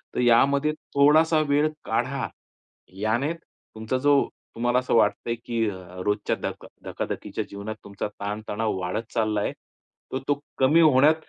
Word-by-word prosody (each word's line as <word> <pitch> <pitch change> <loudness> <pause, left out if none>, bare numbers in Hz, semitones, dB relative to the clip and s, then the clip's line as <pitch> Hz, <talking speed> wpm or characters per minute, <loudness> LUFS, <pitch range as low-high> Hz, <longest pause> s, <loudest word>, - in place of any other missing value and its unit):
तर - - -1
यामध्ये 140 +5 +4 0.2
थोडासा 155 +3 +5
वेळ 145 +2 +4 0.2
काढा. - - -1 0.7
याने 110 - 0
तुमचा 120 -6 -6
जो 140 +1 +3 0.3
तुम्हाला 120 +2 +2
असं 130 - 0
वाटतंय, 115 +1 +2
की 115 -2 0
अ, 95 - -7 0.3
रोजच्या 105 0 0
धक - - -5 0.2
धकाधकीच्या - - -4
जीवनात 100 +2 -5
तुमचा 100 +1 -4
ताणतणाव 105 +1 -2
वाढत 95 +5 -4
चालला 110 -2 +1
आहे. - - -1 0.6
तर 130 - 0
तो 145 0 +1 0.2
कमी 140 +5 +5
होण्यात 150 -1 +6
120 Hz, 140 wpm, -25 LUFS, 110-140 Hz, 0.7 s, होण्यात